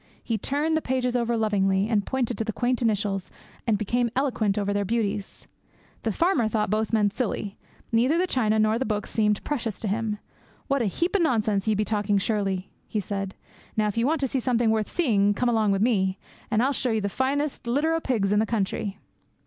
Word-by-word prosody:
He 230 - -1
turned 295 +8 0
the 315 - +1
pages 250 -2 0
over 235 -1 +1
lovingly, 200 -2 +2
and 215 -3 +1
pointed 245 0 -1
to - - +1
the 220 - -2
quaint 245 +3 0
initials, 205 -4 0 0.4
and 220 -3 +3
became 235 +4 0
eloquent 240 -7 +1
over 205 -1 0
their 205 0 +1
beauties. 205 -2 -2 0.6
The 225 - -1
farmer 335 - +2
thought 215 -2 0
both 215 0 0
men 210 -3 +3
silly. 210 -4 -3 0.3
Neither 245 +8 +3
the 360 - +3
china 220 -10 +1
nor 215 +1 +3
the 265 - 0
books 210 -1 -2
seemed 210 -2 +1
precious 235 -8 -3
to 220 - -2
him. 210 +1 -1 0.5
'What 275 -2 +1
a - - +1
heap 340 - -1
o' - - +4
nonsense 215 - +1
ye 215 - +3
be 210 +1 0
talking 205 -1 +1
surely,' 195 -2 -1 0.2
he 215 - -2
said. 195 -1 -4 0.4
'Now 215 - +3
if 205 - -4
ye 230 - +1
want 300 +3 +1
to 270 - +2
see 265 - -1
something 240 -2 +2
worth 220 -1 0
seeing, 205 - +2
come 245 +3 +1
along 215 -4 +2
o' - - +1
me, 195 -3 +2 0.3
and 220 +1 +2
I'll 275 +2 +2
show 260 - -1
you 220 -2 +1
the 200 - 0
finest 270 +5 -1
litter 290 +7 +2
o' 325 - +1
pigs 205 -8 +1
in 205 - +4
the 220 - +1
country.' 200 -2 -2
220 Hz, 215 wpm, -26 LUFS, 205-250 Hz, 0.6 s, o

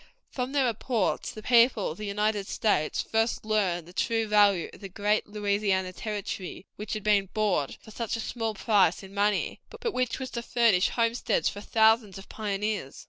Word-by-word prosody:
From 250 0 -3
their 280 -2 +2
reports 230 -2 -1
the 215 - -10
people 235 -5 +4
of 160 - -10
the 210 - -4
United 210 0 0
States 180 -8 0
first 225 0 0
learned 190 -6 0
the 175 - -13
true 225 +3 0
value 205 -4 +4
of - - -13
that 195 -2 -9
great 210 +1 +1
Louisiana 200 -3 0
Territory, 200 -3 -5
which 210 0 -5
had 215 -2 -4
been 205 -3 +2
bought 200 -10 0
for 220 - -14
such 230 0 -3
a - - -4
small 225 -1 -3
price 200 -4 +2
in 195 0 -12
money, 205 0 0
but 465 -2 -4
which 255 -1 -1
was 260 -1 -6
to 235 - -3
furnish 230 -6 +3
homesteads 230 -1 +1
for 205 - -8
thousands 220 -2 +3
of 195 - -11
pioneers. 205 -7 -3
210 Hz, 185 wpm, -27 LUFS, 200-230 Hz, -, people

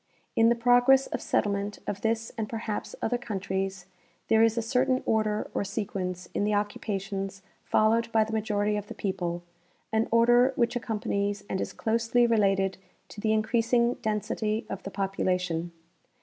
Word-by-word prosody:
In 225 0 +5
the 235 - +3
progress 245 +3 +5
of - - -4
settlement 200 0 0
of 200 - -4
this 225 0 -1
and 220 -2 -3
perhaps 220 -2 -4
other 245 +2 0
coun 220 -5 -4
tries 190 -1 -3 0.4
there 220 0 +5
is 225 0 +3
a - - +2
certain 255 +2 +1
order 215 -1 +1
or - - 0
sequence 190 -3 -4
in - - 0
the 210 0 +1
occupations 195 -2 -3 0.2
fol 215 0 +3
lowed 230 0 0
by 220 -1 +4
the 220 +1 -6
majority 210 -1 0
of 205 0 -5
the - - -8
people, 175 -3 -3 0.5
an 220 +1 +2
order 240 +3 +5
which 235 0 +1
accompanies 205 -3 -2
and 190 - -2
is - - -3
closely 230 +2 +1
related 195 -4 +2 0.3
to 205 - -9
the 215 - +1
increasing 230 +2 +2
density 215 0 -1
of - - -4
the - - -6
population. 180 -4 -1
215 Hz, 165 wpm, -28 LUFS, 195-230 Hz, 0.5 s, In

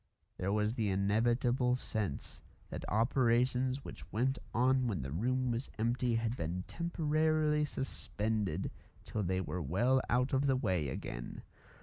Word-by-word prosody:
There 95 +2 -1
was 105 +1 +1
the 110 -4 0
inevitable 120 +6 +2
sense 105 - -3 0.3
that - - -5
operations 125 +3 +2
which - - -9
went 130 +4 +1
on 130 +1 +3
when 95 - -1
the 65 - -5
room 125 - 0
was 120 +3 -3
empty 120 +2 +1
had 115 +1 0
been 90 -2 -3
temporarily 155 -2 +1
suspended 105 - -2 0.3
till 110 - -3
they 95 -1 0
were 90 -1 -3
well 120 - +2
out 125 +3 +2
of 135 +1 +3
the 135 - +4
way 95 - 0
again. - - -6
120 Hz, 140 wpm, -34 LUFS, 100-130 Hz, 0.3 s, the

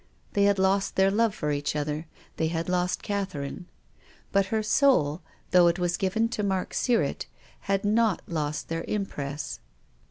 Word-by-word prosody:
They 200 0 +3
had 200 0 +3
lost 190 +1 +1
their 190 0 +4
love 225 0 +2
for 150 - -2
each 145 0 -1
other, 150 +2 -2 0.3
they 160 - +1
had 165 0 -2
lost 180 0 0
Catherine. 185 -5 -4 0.6
But 195 -1 +3
her 220 +2 0
soul, 210 - +3 0.3
though 180 -1 +6
it 170 +1 +2
was 175 -1 0
given 200 +5 +1
to 215 - -2
Mark 190 -2 -1
Sirrett, 245 -2 0 0.4
had 195 0 +1
not 220 -1 +2
lost 155 -3 -2
their 165 0 -3
impress. 150 -9 -4
190 Hz, 160 wpm, -27 LUFS, 160-200 Hz, 0.6 s, though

